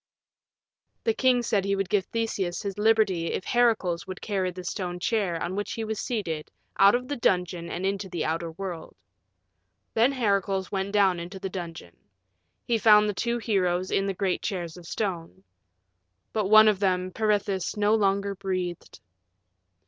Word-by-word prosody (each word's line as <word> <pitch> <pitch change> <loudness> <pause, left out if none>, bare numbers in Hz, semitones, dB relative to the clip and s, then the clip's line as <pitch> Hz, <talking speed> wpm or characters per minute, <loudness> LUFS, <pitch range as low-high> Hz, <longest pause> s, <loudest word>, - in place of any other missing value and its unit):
The 450 - +2
king 255 - +3
said 205 -4 +1
he 200 0 0
would 195 -1 -1
give 200 -1 +1
Theseus 205 -6 -2
his 200 0 -4
liberty 210 -6 +2
if - - -3
Heracles 215 -8 +1
would 185 0 -6
carry 195 -3 -1
the 180 0 -8
stone 180 -1 -4
chair 185 -4 0
on 175 +3 -3
which 205 +1 -3
he 225 - -3
was 220 -1 -3
seated 170 -10 -3 0.3
out 200 +3 +7
of 250 +1 -2
the 290 - -2
dungeon 180 -5 0
and 180 +2 -3
into 195 0 -2
the 170 -3 -3
outer 165 +1 -2
world. 175 -1 -7 1.0
Then 235 +4 +4
Heracles 200 -5 0
went 195 0 -2
down 195 -4 +3
into 175 +3 -7
the 190 -1 -5
dungeon. 165 - -7 0.7
He 230 -1 +1
found 210 -1 +6
the 210 - -1
two 235 +5 -1
heroes 185 -5 0
in 195 - +1
the 195 - -2
great 190 -1 -1
chairs 175 -6 -4
of 175 -2 -12
stone. 170 - -4 0.9
But 215 -3 0
one 215 0 +8
of 210 -3 +3
them, 185 -2 0
Peirithous, 205 -3 0
no 210 +1 +3
longer 200 -2 +1
breathed. 185 -2 -4
195 Hz, 170 wpm, -26 LUFS, 180-215 Hz, 1.0 s, one